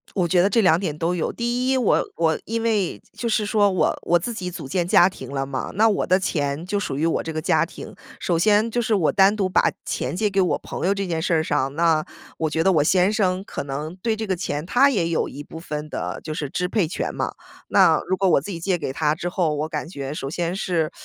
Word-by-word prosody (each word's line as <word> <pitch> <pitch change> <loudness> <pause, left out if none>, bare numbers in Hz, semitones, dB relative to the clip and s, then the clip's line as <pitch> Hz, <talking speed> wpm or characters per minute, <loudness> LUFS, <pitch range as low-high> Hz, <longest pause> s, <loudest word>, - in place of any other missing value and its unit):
我 180 -3 +2
觉 175 +1 +3
得 200 - +2
这 230 - +3
2 170 -3 +5
点 160 -6 -3
都 170 +2 0
有。 170 - -2
第 240 +2 -1
一， 265 - +3
我 245 -5 +2
我 160 -1 +1
因 225 +1 -2
为 215 -5 0
就 235 - -4
是 215 -1 +1
说， 205 -1 +3
我 185 - +1
我 175 0 +3
自 230 +7 -4
己 180 -3 -4
组 170 - -7
建 175 +3 0
家 180 -2 +6
庭 135 -8 -10
了 135 -1 -2
嘛， 135 -2 -4
那 220 +3 +4
我 205 - 0
的 185 +1 +4
钱 145 -3 -2
就 200 +1 -1
属 135 - -3
于 160 +3 +1
我 165 - 0
这 160 - -5
个 155 - -2
家 - - +2
庭。 - - -10 0.2
首 170 -2 0
先 210 +4 +3
就 240 +1 0
是 225 -2 +1
我 175 -6 +2
单 195 +1 +5
独 195 -3 0
把 185 - +3
钱 - - -3
借 210 +1 +1
给 195 -1 +1
我 180 - +1
朋 - - -5
友 200 - +3
这 195 -1 -3
件 165 -2 -2
事 170 - +1
儿 160 0 +2
上， 135 -1 -1
那 160 -2 +3 0.3
我 160 -1 -1
觉 160 +1 0
得 190 - +4
我 150 -4 +3
先 185 +4 +3
生 190 -3 0
可 - - -5
能 150 +4 -5
对 220 +3 -1
这 220 0 -4
个 190 - 0
钱 150 -4 -3
他 270 +7 +4
也 180 -9 0
有 165 - 0
一 145 - -8
部 160 - -10
分 150 -2 -5
的 - - -4
就 155 - -4
是 145 -4 -4
支 180 - -1
配 190 -6 +1
权 - - -3
嘛。 - - -2 0.4
那 - - +5
如 185 - +1
果 190 +1 +2
我 160 - +4
自 180 - -8
己 170 - -4
借 180 +1 0
给 135 - -3
他 150 +1 +1
之 175 +2 -4
后， 175 -4 0
我 150 +2 -2
感 - - -4
觉 140 -4 -6
首 135 - -4
先 170 +3 -2
是， 170 -6 0
180 Hz, 285 characters per minute, -23 LUFS, 160-200 Hz, 0.4 s, 家